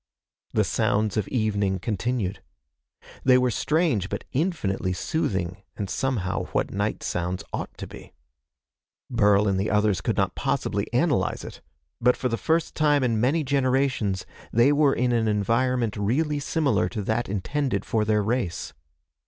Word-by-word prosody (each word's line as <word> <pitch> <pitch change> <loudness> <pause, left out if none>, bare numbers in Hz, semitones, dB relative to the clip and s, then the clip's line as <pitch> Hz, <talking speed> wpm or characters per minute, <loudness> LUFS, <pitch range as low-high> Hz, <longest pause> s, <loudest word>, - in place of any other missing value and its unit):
The - - +3
sounds 105 0 +1
of 105 -3 0
evening 100 -5 0
continued. 105 +1 -2 0.8
They 130 -1 +6
were 125 -1 +2
strange 150 - +1
but - - -4
infinitely 125 - -1
soothing 95 - -2 0.2
and 100 -3 -4
somehow 120 -9 -1
what - - 0
night 105 +2 -2
sounds 90 +1 -2
ought - - -5
to - - -6
be. - - -12 1.0
Burl 105 -3 +4
and 95 -1 +1
the 100 - 0
others 105 -3 +2
could - - -1
not - - +1
possibly - - -1
analyze - - +1
it, - - -9 0.4
but 125 +1 +3
for 125 - -1
the 115 - 0
first 160 +6 0
time 145 -3 +3
in 115 -3 +1
many 145 +6 +2
generations 130 -7 +1 0.3
they 120 +5 +5
were 145 -1 +3
in 125 +1 +1
an 115 -2 +2
environment 115 +2 +1
really 145 +9 0
similar 145 0 +1
to 110 -4 -4
that 110 +3 -1
intended 105 +3 -1
for 110 -2 +1
their 105 -1 +2
race. 100 -6 -2
115 Hz, 155 wpm, -25 LUFS, 100-135 Hz, 1.0 s, They